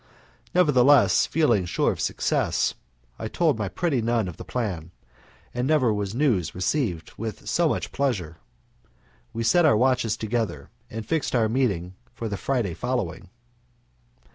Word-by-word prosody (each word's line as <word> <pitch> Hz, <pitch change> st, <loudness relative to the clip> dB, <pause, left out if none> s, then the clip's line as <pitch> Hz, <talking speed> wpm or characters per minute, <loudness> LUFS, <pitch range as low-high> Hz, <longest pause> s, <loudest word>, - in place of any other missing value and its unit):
Nevertheless, 145 Hz, -5 st, +5 dB
feeling 120 Hz, -, +2 dB
sure 85 Hz, -, +1 dB
of -, -, -6 dB
success, -, -, 0 dB, 0.5 s
I 110 Hz, -, -3 dB
told 150 Hz, -1 st, +1 dB
my 105 Hz, -3 st, -1 dB
pretty 145 Hz, -, 0 dB
nun 115 Hz, -2 st, 0 dB
of 85 Hz, -, -7 dB
the -, -, -8 dB
plan, 95 Hz, -10 st, -3 dB, 0.6 s
and 125 Hz, +1 st, -1 dB
never 135 Hz, -7 st, +3 dB
was 105 Hz, 0 st, -3 dB
news 120 Hz, -, +1 dB
received 90 Hz, -, -1 dB
with 110 Hz, -2 st, -6 dB
so -, -, +2 dB
much -, -, -2 dB
pleasure. 100 Hz, -, -2 dB, 0.9 s
We 115 Hz, -, -3 dB
set 175 Hz, +10 st, +4 dB
our 150 Hz, -9 st, +5 dB
watches 125 Hz, -3 st, +2 dB
together, 110 Hz, -, -3 dB, 0.2 s
and 110 Hz, 0 st, -6 dB
fixed 155 Hz, +1 st, -1 dB
our 115 Hz, -2 st, +3 dB
meeting 105 Hz, -8 st, 0 dB, 0.2 s
for 115 Hz, -, -4 dB
the 105 Hz, -, -3 dB
Friday 115 Hz, -5 st, -1 dB
following. 105 Hz, -3 st, -3 dB
115 Hz, 145 wpm, -25 LUFS, 95-130 Hz, 0.9 s, Nevertheless